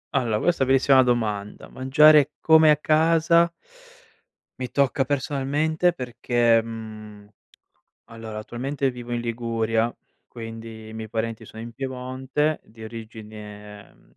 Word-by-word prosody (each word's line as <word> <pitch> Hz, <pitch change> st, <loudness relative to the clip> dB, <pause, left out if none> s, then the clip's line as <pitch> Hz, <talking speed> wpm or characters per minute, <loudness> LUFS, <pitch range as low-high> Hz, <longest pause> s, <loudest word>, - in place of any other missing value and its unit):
Allora 120 Hz, -5 st, +1 dB
questa 175 Hz, -2 st, +1 dB
bellissima 135 Hz, 0 st, +5 dB
domanda. 110 Hz, -5 st, -2 dB
Mangiare 150 Hz, +2 st, +5 dB
come 160 Hz, -1 st, +6 dB
a 150 Hz, -, +5 dB
casa, 165 Hz, +2 st, +3 dB, 1.1 s
mi 125 Hz, -1 st, -5 dB
tocca 135 Hz, -1 st, +1 dB
personalmente 145 Hz, +5 st, 0 dB
perché, 120 Hz, -3 st, +1 dB
mhmm, 110 Hz, -2 st, -9 dB, 0.8 s
allora 115 Hz, -2 st, -7 dB
attualmente 135 Hz, +5 st, -3 dB
vivo 120 Hz, -1 st, -7 dB
in 120 Hz, -, -2 dB
Liguria, 115 Hz, -1 st, -1 dB, 0.3 s
quindi 115 Hz, -1 st, -9 dB
i -, -, -10 dB
miei 110 Hz, 0 st, -6 dB
parenti 115 Hz, 0 st, -4 dB
sono 110 Hz, +1 st, -10 dB
in 120 Hz, -, -8 dB
Piemonte, 130 Hz, +4 st, -2 dB
di 110 Hz, 0 st, -14 dB
origine 105 Hz, -2 st, -10 dB
ehm, -, -, -26 dB
120 Hz, 120 wpm, -24 LUFS, 110-140 Hz, 1.1 s, come